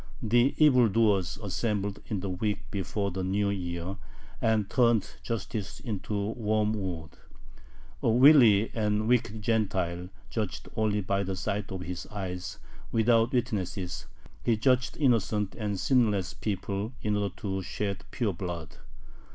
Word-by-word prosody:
The 120 +5 +3
evil 125 -7 +6
doers 100 -4 +2
assembled 100 0 -1
in 105 -5 -2
the 100 - -3
week 105 +2 -1
before 100 0 -2
the 95 +1 -3
New 100 +2 +1
Year, 90 0 -4 0.4
and 110 -3 +2
turned 115 -3 +3
justice 110 -2 -4
into 105 -2 -3
wormwood. 105 -7 -1 0.9
A - - +2
wily 120 -4 +7
and 105 -1 0
wicked 115 -3 +1
Gentile 95 -6 0 0.2
judged 110 -4 -3
only 105 -1 +1
by 100 +1 0
the 95 -1 -2
sight 100 +2 -3
of 95 -1 -4
his 90 -1 -5
eyes, 90 -3 -5 0.3
without 115 +1 +3
witnesses; 100 -7 -2 0.3
he 115 -2 +2
judged 125 +2 +2
innocent 110 -7 +2
and 105 -4 -3
sinless 105 -3 +2
people 100 +2 -3
in 105 -1 +1
order 100 -1 -1
to 95 -2 -3
shed 100 +1 -3
pure 110 -6 -1
blood. 85 -2 -6
105 Hz, 135 wpm, -29 LUFS, 95-115 Hz, 0.9 s, wily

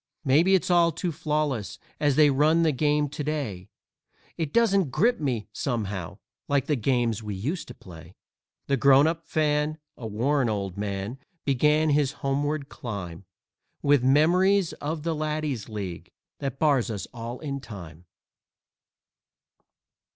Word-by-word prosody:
Maybe 160 +8 +5
it's 185 - 0
all 170 -1 +5
too 170 +3 -3
flawless 150 - -2 0.2
as 145 -3 +2
they 150 -1 +6
run 155 +5 +3
the 160 - +3
game 150 +1 +1
to 150 - -5
day 135 -12 -3 0.7
It 160 -4 -3
doesn't 200 -8 +3
grip 235 - +2
me, 125 -8 -2
somehow, 105 -9 -3 0.3
like 140 -2 +1
the 150 - +1
games 120 -3 0
we 105 -2 -5
used 145 - -3
to 125 - -10
play." 85 -1 -13 0.5
The 140 - +1
Grown 140 +2 +6
up 165 +1 -2
Fan, 150 0 +1 0.2
a 115 - -7
worn 125 +4 +1
old 100 -3 -3
man, 100 +4 -4 0.3
began 150 +3 +3
his 145 -2 +2
homeward 145 +1 -2
climb 100 - -7 0.6
With 145 -3 +4
memories 175 +7 +4
of 150 +1 -4
the 165 0 0
Laddies' 150 -6 -3
League 100 -5 -6 0.3
that 135 -2 -4
bars 140 -6 +2
us 105 -3 -4
all 120 +1 -6
in 140 -3 -4
time. 90 - -10
140 Hz, 145 wpm, -26 LUFS, 115-155 Hz, 0.7 s, they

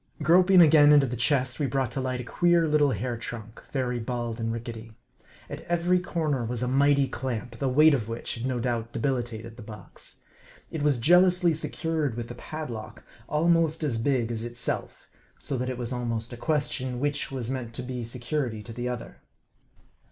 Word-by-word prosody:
Groping 180 +4 +6
again 150 -2 +7
into 145 -2 +6
the 125 -1 -3
chest, 125 +2 +1
we 145 - +1
brought 135 -3 -1
to 135 - -2
light 130 -1 -2
a - - -4
queer 170 +6 +2
little 150 -1 +3
hair 120 +1 -2
trunk, 115 -1 -8
very 125 -3 -1
bald 120 -1 -3
and 115 0 -1
rickety. 115 -1 -7 0.5
At - - -7
every 175 +1 +2
corner 155 -7 -1
was 120 +1 -3
a - - 0
mighty 140 +1 +3
clamp, 120 -2 -5
the 135 - 0
weight 150 +4 +6
of 115 -5 -1
which 115 +1 -4
had 120 +2 -4
no 125 -2 -1
doubt 115 -1 -2
debilitated 115 -3 -3
the - - -9
box. 105 -3 -11 0.5
It 160 - -4
was 145 -3 +2
jealously 175 +5 +4
secured 155 -4 -2
with 120 0 -5
a - - -7
padlock, 120 -7 -7 0.3
almost 165 0 +2
as 120 -7 0
big 120 -3 +1
as 115 -1 -3
itself; 120 0 -4 0.3
so 140 - -3
that 125 +1 -2
it 130 - -4
was 120 0 -3
almost 115 -1 -3
a - - -5
question, 130 -4 -1
which 145 +1 -1
was 130 -2 -3
meant 120 -3 -5
to 125 - -4
be 125 -1 -5
security 120 -1 -3
to 115 - -9
the 120 +2 -3
other. 125 -1 -6
125 Hz, 190 wpm, -27 LUFS, 115-150 Hz, 0.5 s, again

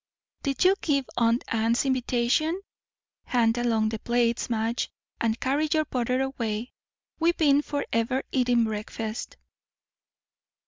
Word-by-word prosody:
"Did 275 +1 0
you 375 - +7
give 280 -4 +1
aunt 230 +1 +2
Anne's 230 +3 +1
invitation? 260 +6 +1 0.7
Hand 230 -2 +2
along 225 -3 +2
the 220 0 -4
plates, 235 +1 +1
Madge, 230 +1 -1 0.3
and 230 +1 0
carry 290 +4 0
your 310 -1 +2
butter 255 0 0
away. 235 -3 -3 0.5
We've 335 +1 +2
been 290 -2 +4
for 290 -1 -3
ever 230 +4 +1
eating 245 -2 +3
breakfast." 220 +1 -4
240 Hz, 125 wpm, -26 LUFS, 230-275 Hz, 0.7 s, you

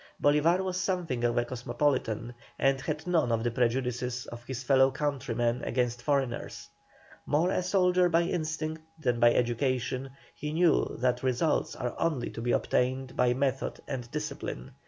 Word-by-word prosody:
Bolívar 155 +6 +3
was 185 -1 -2
something 175 -11 -1
of 120 0 +1
a 120 - +2
cosmopolitan, 120 -2 -1 0.2
and 135 -1 +2
had 155 +2 -3
none 165 -9 +2
of 115 -1 +1
the 120 - 0
prejudices 125 0 -1
of 120 0 -9
his 130 0 -5
fellow 135 0 +5
countrymen 125 -4 -1
against 120 -1 -1
foreigners. 135 -2 -1 0.6
More 165 +5 +2
a - - +1
soldier 180 -1 +3
by 170 0 +3
instinct 155 -2 -2 0.2
than 125 -6 0
by 120 0 +6
education, 125 +2 0 0.2
he 150 0 -5
knew 170 0 +2
that 125 -1 +1
results 130 +5 0
are 125 -2 -3
only 155 -7 0
to 115 - -6
be 120 +1 0
obtained 130 +2 0
by 125 0 +3
method 135 0 -1
and 125 -2 -4
discipline. 150 - -5
130 Hz, 155 wpm, -29 LUFS, 120-155 Hz, 0.6 s, by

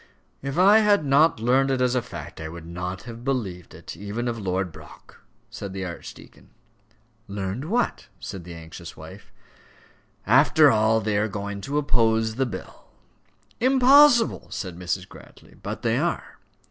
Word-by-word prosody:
"If 140 +3 -4
I 200 +4 +7
had 205 -7 +3
not 140 0 +4
learned 130 +4 +2
it 135 -1 0
as 125 0 +1
fact, 120 -8 -5
I 80 - -5
would 85 0 -10
not 90 +2 -5
have 115 -1 -9
believed 105 - -3
it, - - -9
even 105 +4 -4
of 115 -1 -3
Lord 95 -2 -2
Brock," 80 -2 -15 0.3
said 100 -2 -7
the 95 -1 -4
archdeacon. 85 -2 -10 0.8
"Learned 100 +5 -4
what?" 235 +8 -1
said 95 -3 -7
the 85 0 -9
anxious 80 -1 -10
wife. - - -12 0.9
"After 140 +6 +5
all, 110 0 +3
they 105 0 0
are 110 - +1
going 100 -1 -5
to 140 +8 -3
oppose 115 -6 +2
the 130 +3 -1
bill." 115 - -9 0.7
"Impossible!" 260 -1 +5
said 90 -3 -5
Mrs. 90 +1 -3
Grantly. - - -16
"But - - -6
they - - +1
are." - - -3
110 Hz, 155 wpm, -24 LUFS, 95-140 Hz, 0.9 s, I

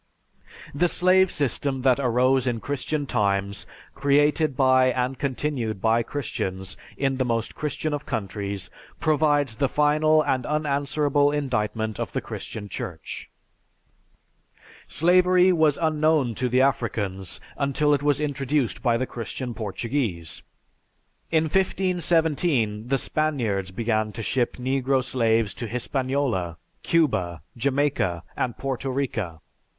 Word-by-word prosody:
_) - - -17
The 175 +5 +2
slave 185 +2 +4
system 135 -2 -1
that 130 0 +4
arose 130 +1 +2
in 120 -2 0
Christian 145 +3 -2
times, 100 -5 -1 0.3
created 145 +1 +2
by 130 -1 +5
and 125 0 -1
continued 130 -6 -2
by 115 +3 +3
Christians 95 -7 -4 0.2
in 135 -1 0
the 130 - +1
most 115 -2 -1
Christian 150 +1 -3
of 145 0 -3
countries, 100 -2 -4 0.3
provides 145 -6 +2
the 140 -2 +1
final 155 +1 +3
and 130 -3 0
unanswerable 145 0 +1
indictment 110 -6 -2
of - - -4
the - - 0
Christian 105 -2 -7
Church. 90 -4 -7 1.6
Slavery 180 +3 +4
was 155 -4 +3
unknown 155 -5 +2
to 125 +3 -1
the 125 +2 +3
Africans 105 -8 -1 0.2
until 145 +1 +1
it 140 - +1
was 145 -1 +2
introduced 140 -3 -1
by 120 -3 +2
the 130 - -1
Christian 120 +1 -5
Portuguese. 110 - -3 0.9
In 160 -1 +3
1517 160 - +1
the 135 +1 +2
Spaniards 120 -12 -1
began 110 +1 -1
to 115 - -5
ship 120 +2 0
negro 130 +1 +1
slaves 115 -5 +1
to 105 +5 -5
Hispaniola, 125 - -1 0.2
Cuba, 95 - +1
Jamaica, 130 - 0
and 120 - -2
Porto 135 0 -3
Rica. 115 - -2
130 Hz, 125 wpm, -25 LUFS, 115-145 Hz, 1.6 s, by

